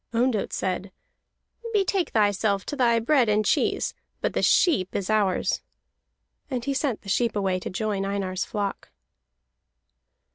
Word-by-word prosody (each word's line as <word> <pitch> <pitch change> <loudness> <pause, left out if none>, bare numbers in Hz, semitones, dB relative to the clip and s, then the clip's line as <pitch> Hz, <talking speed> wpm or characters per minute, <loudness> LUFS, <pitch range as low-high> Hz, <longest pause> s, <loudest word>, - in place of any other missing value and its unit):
Ondott 235 -3 +1
said: 185 +1 -2 0.8
"Betake 390 -3 +1
thyself 205 -2 +1
then 240 -5 +2
to - - -13
bread 260 -5 +4
and 210 0 +2
cheese, - - +1 0.3
but - - -1
the - - 0
sheep 280 - +3
is 200 +1 -1
ours." 205 -4 +1 0.9
And 250 -4 -3
he 280 - 0
sent 265 -6 -1
the - - -14
sheep 230 +3 +1
away 190 -2 0
to - - -5
join 205 0 -2
Einar's 195 -2 -2
flock. 205 -3 -4
215 Hz, 140 wpm, -25 LUFS, 195-245 Hz, 0.9 s, bread